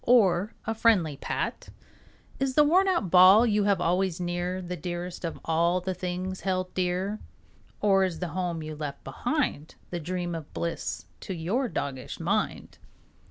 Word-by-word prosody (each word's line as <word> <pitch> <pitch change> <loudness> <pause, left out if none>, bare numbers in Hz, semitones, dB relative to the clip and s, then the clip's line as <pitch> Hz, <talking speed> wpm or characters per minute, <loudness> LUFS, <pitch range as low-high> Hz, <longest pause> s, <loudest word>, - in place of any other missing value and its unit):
Or 205 -4 +4
a 225 - 0
friendly 215 -10 +3
pat? - - -3 0.7
Is 270 -1 0
the 300 - +7
worn 365 +6 +4
out 340 - +1
ball 190 +5 +8
you 210 -3 +2
have 200 -3 +3
always 180 +1 +1
near 175 +1 -2
The 180 -1 -5
dearest 175 +2 -5
of 165 - -4
all 170 +2 +2
the 185 +1 -3
things 185 +1 -4
held 185 -1 -1
dear? 185 +3 -1 0.6
Or 195 -2 +4
is 180 -3 -1
the 180 - -3
home 170 -1 -2
you 155 0 -6
left 145 -2 -6
behind 245 - -2 0.2
The 175 - -2
dream 175 +1 -3
of 160 -3 -7
bliss 170 0 -3
to 190 - -5
your 215 +11 -1
doggish 130 -7 -4
mind? - - -2
180 Hz, 160 wpm, -27 LUFS, 170-200 Hz, 0.7 s, ball